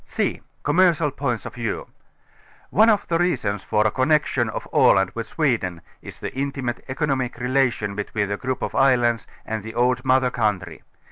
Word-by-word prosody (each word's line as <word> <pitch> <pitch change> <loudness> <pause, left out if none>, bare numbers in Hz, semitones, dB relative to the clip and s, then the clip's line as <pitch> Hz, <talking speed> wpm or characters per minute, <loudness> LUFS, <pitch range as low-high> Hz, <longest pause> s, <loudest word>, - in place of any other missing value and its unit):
c) - - -2 0.2
Commercial 170 -5 +3
Points 125 -6 -2
of - - -7
Vietv. 115 -3 -4 0.8
One 220 +3 +5
of 210 -2 +2
the 165 -1 +1
reasons 105 - 0
for 105 0 +1
a 110 - +3
connection 130 -3 +1
of - - -5
Aland 95 -1 +4
with 115 -1 -5
Swe 140 -2 +1
den, 90 -4 -6 0.2
is - - -10
the - - -5
intimate 135 -2 -3
economic 130 -3 -1
relation 125 -4 0
between 100 +1 -2
the 100 - -2
grouiJ 130 -1 -3
of - - -7
islands 120 -4 +3 0.2
and 110 -1 -3
the 110 +2 -9
old 125 +1 +2
mother 130 -1 +3
country. 105 -7 -2
125 Hz, 175 wpm, -23 LUFS, 110-135 Hz, 0.8 s, One